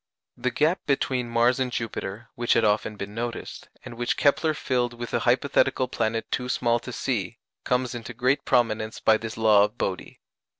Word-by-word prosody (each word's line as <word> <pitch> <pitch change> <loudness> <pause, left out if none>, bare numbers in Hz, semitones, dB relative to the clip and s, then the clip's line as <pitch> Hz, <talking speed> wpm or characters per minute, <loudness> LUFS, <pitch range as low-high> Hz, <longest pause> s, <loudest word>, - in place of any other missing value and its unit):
The 130 - -1
gap 155 +8 +1
between 130 -3 0
Mars 120 +2 +3
and 130 -1 -1
Jupiter, 115 -1 -5
which 120 0 +1
had 115 - +3
often 105 0 +1
been 100 0 -7
noticed, 115 +1 -5 0.2
and - - -8
which 120 +1 -1
Kepler 155 +2 +2
filled 120 -4 -1
with 120 0 -7
a - - +2
hypothetical 130 0 +2
planet 115 -2 -2
too 125 0 -2
small 120 -1 +1
to 125 - -8
see, 115 -4 -2 0.3
comes 125 -1 0
into 120 0 -7
great 130 +4 +1
prominence 110 -2 +1
by 110 0 +4
this 115 0 -7
law 110 -2 +5
of 105 +3 -2
Bode. 95 -2 -3
120 Hz, 180 wpm, -25 LUFS, 110-125 Hz, 0.3 s, law